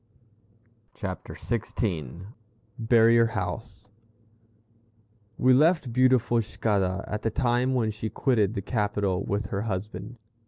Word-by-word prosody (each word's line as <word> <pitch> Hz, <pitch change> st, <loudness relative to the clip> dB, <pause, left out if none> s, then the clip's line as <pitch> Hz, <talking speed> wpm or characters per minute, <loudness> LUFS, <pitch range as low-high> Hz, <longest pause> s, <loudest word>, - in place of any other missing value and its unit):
CHAPTER 95 Hz, -4 st, -6 dB
XVI 95 Hz, -, -3 dB, 0.5 s
BARRIER 115 Hz, 0 st, +5 dB
HOUSE 105 Hz, 0 st, -5 dB, 1.5 s
We 130 Hz, +1 st, +4 dB
left 150 Hz, -2 st, +3 dB
beautiful 125 Hz, -2 st, +3 dB
Cicada 100 Hz, -3 st, -1 dB
at 105 Hz, -, -4 dB
the 115 Hz, -, 0 dB
time 120 Hz, +3 st, +1 dB
when 115 Hz, -3 st, +1 dB
she 110 Hz, +1 st, -5 dB
quitted 110 Hz, -6 st, +1 dB
the 100 Hz, -, -3 dB
capital 100 Hz, -4 st, -1 dB
with 100 Hz, +1 st, -3 dB
her 100 Hz, -, -1 dB
husband. 105 Hz, +2 st, -5 dB
110 Hz, 110 wpm, -26 LUFS, 100-120 Hz, 1.5 s, BARRIER